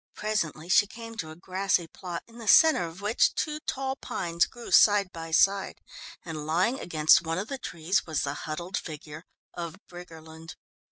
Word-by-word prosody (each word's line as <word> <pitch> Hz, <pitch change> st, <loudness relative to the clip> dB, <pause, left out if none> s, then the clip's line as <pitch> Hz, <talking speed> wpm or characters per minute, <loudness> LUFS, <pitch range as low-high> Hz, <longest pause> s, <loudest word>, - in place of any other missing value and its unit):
Presently 170 Hz, -7 st, -2 dB
she 200 Hz, +3 st, +4 dB
came 230 Hz, +2 st, -10 dB
to 160 Hz, -6 st, -5 dB
a 155 Hz, -, -10 dB
grassy 185 Hz, 0 st, -1 dB
plot, 175 Hz, +1 st, -7 dB
in 235 Hz, +1 st, -15 dB
the 225 Hz, -, -9 dB
centre 310 Hz, -, +6 dB
of 165 Hz, +4 st, -11 dB
which 210 Hz, +3 st, +2 dB
two 305 Hz, -1 st, -2 dB
tall 265 Hz, 0 st, -2 dB
pines 170 Hz, -, -1 dB
grew 240 Hz, -1 st, -11 dB
side 205 Hz, -3 st, +5 dB
by 165 Hz, -1 st, -7 dB
side, 195 Hz, +4 st, +2 dB, 0.5 s
and 155 Hz, -3 st, -6 dB
lying 185 Hz, -, +1 dB
against 155 Hz, -2 st, +4 dB
one 165 Hz, 0 st, -3 dB
of 200 Hz, +4 st, -4 dB
the 275 Hz, -, -4 dB
trees 170 Hz, -2 st, -1 dB
was 155 Hz, -3 st, -1 dB
the 140 Hz, -, -2 dB, 0.2 s
huddled 170 Hz, +5 st, -4 dB
figure 155 Hz, 0 st, -8 dB, 0.3 s
of 170 Hz, -1 st, -6 dB
Briggerland. 160 Hz, -2 st, -11 dB
175 Hz, 175 wpm, -27 LUFS, 160-205 Hz, 0.5 s, centre